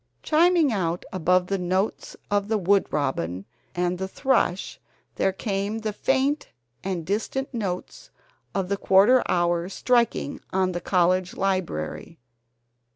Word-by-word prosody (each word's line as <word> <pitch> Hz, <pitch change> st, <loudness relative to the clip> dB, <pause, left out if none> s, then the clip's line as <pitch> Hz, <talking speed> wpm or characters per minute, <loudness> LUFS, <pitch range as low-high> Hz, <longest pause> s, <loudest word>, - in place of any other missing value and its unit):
Chiming 325 Hz, -3 st, +4 dB
out 175 Hz, -3 st, -1 dB
above 180 Hz, 0 st, +2 dB
the 195 Hz, +1 st, -2 dB
notes 185 Hz, +3 st, -2 dB
of 205 Hz, -1 st, +1 dB
the 220 Hz, 0 st, +1 dB
wood 200 Hz, +1 st, +2 dB
robin 95 Hz, -, -2 dB, 0.3 s
and 180 Hz, 0 st, 0 dB
the 190 Hz, -, -2 dB
thrush 235 Hz, -5 st, 0 dB, 0.4 s
there 190 Hz, -, +2 dB
came 200 Hz, +2 st, -2 dB
the 215 Hz, -1 st, -3 dB
faint 270 Hz, +6 st, 0 dB, 0.3 s
and 185 Hz, -4 st, -3 dB
distant 225 Hz, -, -2 dB
notes 195 Hz, -6 st, -4 dB, 0.5 s
of 195 Hz, -2 st, 0 dB
the 200 Hz, +1 st, -1 dB
quarter 205 Hz, +7 st, +5 dB
hour 175 Hz, 0 st, +1 dB
striking 235 Hz, -, 0 dB
on 185 Hz, -1 st, +1 dB
the 175 Hz, -1 st, -4 dB
college 180 Hz, +1 st, +1 dB
library. 175 Hz, -, -2 dB
190 Hz, 130 wpm, -25 LUFS, 180-220 Hz, 0.5 s, quarter